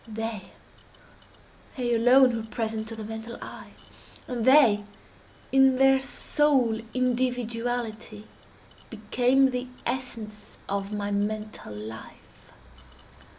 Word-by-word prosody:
They—they 225 +2 -8
alone 245 +2 +5
were 225 -1 -5
present 220 -2 -3
to 225 - -5
the 220 - -7
mental 225 +2 -7
eye, - - -10 0.5
and 240 -3 -3
they, 260 -7 +6 0.7
in 265 -1 +5
their 270 0 +5
sole 265 -4 +1
individuality, 240 -3 -2 0.6
became 250 +5 +2
the 250 0 -3 0.2
essence 230 -4 -5
of 200 0 -3
my 205 -1 -3
mental 210 - -3
life. 110 +2 -11
230 Hz, 95 wpm, -26 LUFS, 215-255 Hz, 0.7 s, they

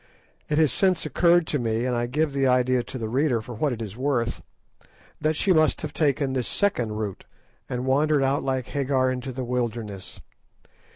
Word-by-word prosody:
It 150 - +1
has 155 -3 +4
since 190 -2 +2
occurred 175 -1 +3
to 150 - -1
me, 115 0 -1
and 125 -1 0
I 120 0 -1
give 150 +3 0
the 135 -1 +2
idea 125 0 +3
to 130 - -7
the 115 -3 -3
reader 130 +1 +1
for 115 +3 -8
what 135 +6 0
it 115 -2 -4
is 105 -2 -7
worth, 125 -3 -1 0.8
that 155 0 +1
she 185 +4 +2
must 155 -1 +2
have 150 - -4
taken 140 -3 +1
this 130 -2 -1
second 125 - 0
route, 105 -3 -5 0.4
and 125 +1 -3
wandered 145 +2 +2
out 135 +1 +1
like 130 -2 -1
Hagar 130 -1 0
into 130 +1 -4
the 130 +1 -4
wilderness. 110 -6 -4
130 Hz, 190 wpm, -25 LUFS, 120-150 Hz, 0.8 s, has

